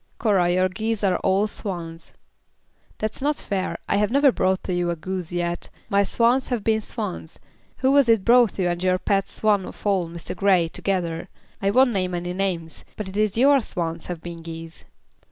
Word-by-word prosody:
"Cora, 195 -6 +2
your 185 +1 +3
geese 215 +3 -3
are 185 -3 +3
all 195 +2 +2
swans." 170 -6 -6 0.9
"That's 215 +3 -4
not 295 +2 +1
fair. 190 -7 -3
I - - +1
have 210 0 +2
never 280 +2 +5
brought 190 -4 0
to 185 - -3
you 175 0 0
a 170 - 0
goose 180 +1 -4
yet. 175 0 -3 0.2
My 200 -1 +3
swans 240 +5 +2
have 240 -5 -2
been 220 0 +2
swans. 205 -7 -6 0.5
Who 265 - +5
was 280 -3 +4
it 225 -4 +4
brought 240 -3 +5
you 185 -2 +1
and 175 0 -2
your 185 0 +3
pet 195 +1 0
swan 210 -3 +1
of - - -11
all, 190 -4 +1
Mr. 170 -1 -6
Grey, 185 -4 +3
together? 170 -3 -2 0.3
I 195 - +2
won't 255 +4 +4
name 185 -4 -1
any 175 +1 -3
names, 180 -4 -3
but 210 -3 -5
it 190 - -10
is 215 0 +1
your 275 +3 +6
swans 170 -7 -4
have 175 -3 -5
been 170 -1 -7
geese." 165 0 -9
190 Hz, 195 wpm, -23 LUFS, 175-215 Hz, 0.9 s, your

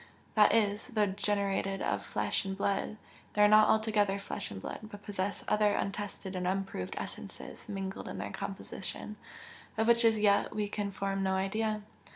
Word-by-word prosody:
That 210 -2 +6
is, 210 -1 +2
though 220 -6 +2
generated 195 -1 0
of - - -1
flesh - - -1
and 195 -1 -4
blood, 200 +2 0 0.4
they 210 - +5
are - - +9
not 215 0 +7
altogether 210 -3 +3
flesh 200 - -5
and 95 - -6
blood, - - -5
but 210 -1 -10
possess 200 0 -2
other 210 -1 +3
untested 200 -1 -3
and 180 -1 -1
unproved 190 - -2
essences - - -7
mingled 195 -1 -4
in - - -5
their 100 +1 -4
composition, 195 - -5 0.6
of 220 - +3
which 235 0 +5
as 225 -1 +5
yet 205 -1 +3
we 210 -1 0
can 205 0 -2
form 195 0 -2
no 190 0 +1
idea. 215 +2 0
205 Hz, 175 wpm, -32 LUFS, 195-215 Hz, 0.6 s, are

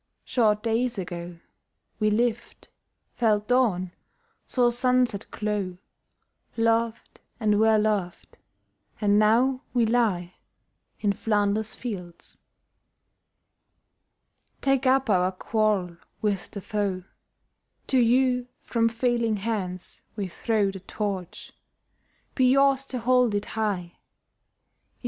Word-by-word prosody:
Short 215 -4 +1
days 235 +1 0
ago 175 -2 -6 0.6
We 215 -1 +2
lived, 235 +2 -2 0.4
felt 210 -3 +1
dawn, 215 -8 +2 0.6
saw 245 -2 +2
sunset 245 -3 +1
glow, 205 -4 -3 0.8
Loved, 230 0 0 0.2
and 210 -2 +2
were 220 0 +5
loved, 210 -5 -2 0.6
and 205 -1 +3
now 245 +5 +3
we 240 -2 +4
lie 210 -7 +1 0.7
In 205 -2 +2
Flanders 210 0 0
fields. 180 -8 -8 2.2
Take 270 -1 +1
up 265 0 +3
our 185 -3 +2
quarrel 195 -3 0 0.2
with 205 -3 -1
the 200 - -7
foe: 195 -2 -2 0.8
To 260 - +2
you 250 +1 +3 0.2
from 230 -1 +1
failing 235 -1 0
hands 190 -4 -4
we 205 -3 -3
throw 205 +2 0
The 195 - -8
Torch: 190 -2 -5 0.8
be 255 -2 +3
yours 275 0 +3
to 255 - -3
hold 250 -2 +2
it 205 - -1
high! 200 -6 -2
215 Hz, 105 wpm, -26 LUFS, 200-240 Hz, 2.2 s, were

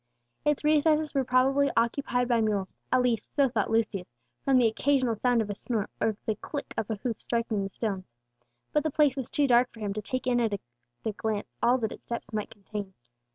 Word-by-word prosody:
Its 295 0 +1
recesses 305 0 +3
were 275 -2 +2
probably 265 +3 +3
occupied 245 +1 +1
by 235 -2 +3
mules, 205 -3 -1
at 255 - +4
least 235 -3 -1
so 280 -2 +5
thought 225 -4 0
Lucius, 215 -5 0 0.3
from 270 -1 +4
the 250 - +5
occasional 255 +1 +2
sound 240 +1 +2
of 210 - -8
a - - -2
snort, 215 0 -2
or 220 -2 +1
the 220 - +1
click 285 - -6
of 220 - -2
a 220 - 0
hoof 225 +1 -4
striking 230 -3 -1
the 195 - -3
stones; 190 - -4 0.6
but 300 - +4
the 310 - 0
place 295 -2 +3
was 265 -3 -3
too 290 - +2
dark 245 -1 +4
for 225 - -14
him 205 -2 -2
to 215 - -3
take 255 +4 -3
in 245 -1 +2
at 215 -4 0 0.5
a 220 - +1
glance 210 0 -3
all 245 +2 +4
that 220 -4 -2
its - - -11
depths 235 -2 -4
might 210 -1 -2
contain. 205 -2 -7
235 Hz, 215 wpm, -28 LUFS, 215-265 Hz, 0.6 s, so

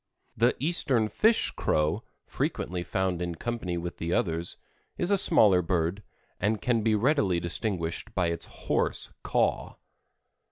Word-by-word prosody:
The 120 +3 +3
eastern 135 -7 +2
fish 220 - +2
crow, 75 0 0 0.2
frequently 90 0 -3
found 95 -1 -1
in 85 -1 -3
company 100 -3 -3
with 85 +1 -5
the 85 +1 -2
others, 85 -6 -1 0.4
is 175 +3 -1
a - - +5
smaller 105 - +6
bird, 85 +2 -1 0.4
and 105 +3 0
can 120 0 +1 0.2
readily 120 - +2
be 85 - -1
distinguished 85 -1 -3
by 90 -2 +1
its 85 - -3
hoarse - - -1
caw. - - 0
95 Hz, 135 wpm, -28 LUFS, 85-120 Hz, 0.4 s, smaller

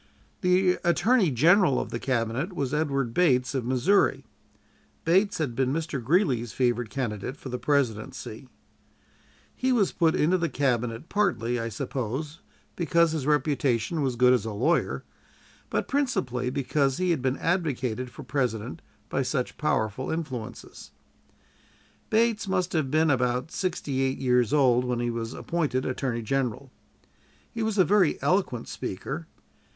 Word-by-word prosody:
The 180 0 +3
Attorney 200 +3 +3
General 160 - +4
of - - -4
the 115 - -3
Cabinet 125 - -1
was 140 -5 -2
Edward 140 -6 0
Bates, 130 -6 +2
of 130 -3 -2
Missouri. 135 +1 +2 0.8
Bates 190 +5 +3
had 140 -7 -2
been 130 0 +1
Mr. 155 -4 -3
Greeley's 130 - +1
favorite 120 -2 0
candidate 120 +1 -4
for 135 - -8
the 125 0 -4
presidency. 130 -2 -2 1.1
He 260 +1 0
was 220 -6 +2
put 165 -2 +2
into 180 +5 +2
the 170 -1 0
Cabinet 125 -1 -1
partly, 120 - 0
I 115 0 -3
suppose, 130 +7 -4 0.4
because 170 -1 +2
his 150 -4 -3
reputation 145 -1 +1
was 130 -3 0
good 125 +1 +5
as 125 -5 +2
a 110 - -4
lawyer, 130 +12 0 0.7
but - - -1
principally 130 - -1
because 135 0 0
he 185 -1 +1
had 160 -6 0
been 130 +1 0
advocated 130 - -1
for - - -10
President 125 0 -2 0.3
by 135 - -1
such 130 -1 -2
powerful 120 -4 -1
influences. 150 -9 -6 1.2
Bates 225 -1 +2
must 185 -1 0
have 155 -5 0
been 155 +2 +3
about 125 +2 0
sixty 150 -7 -2
eight 135 0 0
years 125 -2 +2
old 130 -4 +4
when 125 -1 -1
he 120 0 -1
was 115 +1 -4
appointed 150 -7 -1
Attorney 125 -2 -2
General. 135 +1 -2 0.8
He 230 - -4
was 220 -1 -1
a 185 - +5
very 195 -5 +3
eloquent 180 - 0
speaker. 145 - -5
135 Hz, 145 wpm, -26 LUFS, 125-170 Hz, 1.2 s, good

